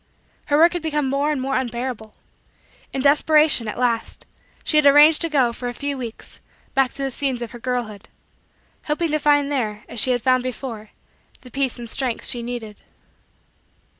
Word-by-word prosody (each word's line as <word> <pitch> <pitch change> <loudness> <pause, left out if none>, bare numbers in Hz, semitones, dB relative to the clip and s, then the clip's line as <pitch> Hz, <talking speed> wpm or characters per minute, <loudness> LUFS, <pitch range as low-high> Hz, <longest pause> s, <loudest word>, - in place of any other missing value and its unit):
her 290 - +3
work 335 +3 +6
had 350 - -3
become 300 -3 -1
more 280 +2 0
and 295 - -1
more 270 +1 -2
unbearable. 240 -3 -4 0.8
In 265 - -3
desperation, 300 -3 +4
at 215 - -5
last, 240 -2 -1 0.4
she 305 - +1
had 300 -1 +5
arranged 295 +2 +7
to 330 - +1
go, 260 -6 +2
for 245 +1 -5
a 245 - -7
few 285 +2 -3
weeks, 240 -4 -7 0.3
back 270 -1 +3
to 275 - -5
the 270 - -2
scenes 260 -2 -2
of 230 - -7
her 240 - -10
girlhood; 230 -4 -4 0.8
hoping 310 +1 -1
to 305 - +1
find 290 -1 +2
there, 215 -6 -2
as 235 - -6
she 255 - +3
had 245 -2 0
found 255 -1 +3
before, 240 -4 -6 0.5
the 250 - -14
peace 270 -1 -1
and 240 -1 -7
strength 250 0 -3
she 240 - 0
needed. 235 -3 -7
260 Hz, 185 wpm, -22 LUFS, 240-290 Hz, 0.8 s, arranged